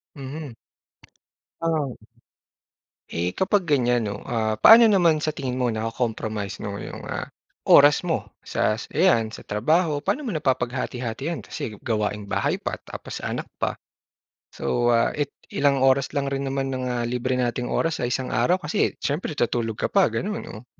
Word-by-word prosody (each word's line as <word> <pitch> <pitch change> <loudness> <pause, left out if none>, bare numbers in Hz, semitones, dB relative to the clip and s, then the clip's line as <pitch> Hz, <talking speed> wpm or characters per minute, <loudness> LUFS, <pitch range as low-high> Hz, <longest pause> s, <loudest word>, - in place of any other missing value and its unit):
Mhm. 140 -1 -7 1.1
Ah 155 -6 -1 1.1
Eh, 85 +2 -2
kapag 190 - +1
ganyan 125 -7 +2
'no, 100 - -6
ah, 110 -2 -1
paano 230 +2 +9
naman 170 -6 +3
sa 155 - +1
tingin 135 -4 -4
mo 125 -2 +1
nako-compromise 110 -2 -3
'no, 100 -1 -4
yung, - - -8
ah, - - -4 0.4
oras 145 +1 +7
mo 170 -2 -2
sa, 105 - 0 0.2
ayan, 150 -10 +3
sa - - -10
trabaho. 150 - +1
Paano 295 +1 -1
mo - - -1
napapaghati-hati 125 -3 -2
'yan? 170 - -3
Kasi 110 -2 -6
gawaing 105 -2 -2
bahay - - 0
pa, - - -3
tapos - - -8
anak - - -3
pa. - - -1 0.8
So, 120 0 0
ah, 115 - +3
it 145 -2 -1 0.2
ilang 140 -1 +2
oras 135 +1 +3
lang 140 -1 0
rin 135 0 -2
naman 135 0 -2
ng, 130 -1 -3
ah, 120 -1 -1
libre 125 +1 -1
nating 125 0 -1
oras 165 -1 0
sa 120 - 0
isang 130 +1 -2
araw 120 +11 +3
kasi 150 - 0
siyempre 150 +1 -2
tuutulog 115 -3 0
ka - - 0
pa, 195 -2 +5
gano'n, 210 +3 -3
oh. 110 - -12
130 Hz, 160 wpm, -24 LUFS, 115-150 Hz, 1.1 s, paano